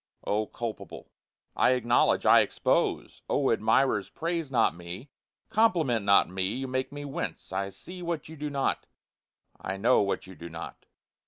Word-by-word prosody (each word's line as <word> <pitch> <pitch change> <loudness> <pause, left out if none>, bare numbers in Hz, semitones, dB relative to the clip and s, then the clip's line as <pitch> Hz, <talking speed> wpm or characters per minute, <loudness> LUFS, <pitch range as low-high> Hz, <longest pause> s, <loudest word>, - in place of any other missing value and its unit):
O 105 +1 0
culpable! 115 -2 -7 0.4
I - - +4
acknowledge 120 -1 +2
I - - +8
expose! - - 0
(O 140 -2 +2
admirers, 110 -1 +2
praise 165 -2 -3
not 125 - +3
me 90 +10 -9 0.4
compliment 170 - +2
not 100 0 +5
me 95 +3 -2
you 135 +1 -3
make 130 0 -2
me 145 0 -7
wince, 140 - -5
I 100 0 -1
see 180 - -9
what 170 -2 -3
you 160 - -10
do 150 0 -4
not 140 -1 -1 0.7
I 95 +1 -4
know 120 +6 +4
what 100 -1 -1
you 95 - -11
do 85 -1 -9
not.) 80 0 -9
125 Hz, 160 wpm, -28 LUFS, 100-145 Hz, 0.7 s, I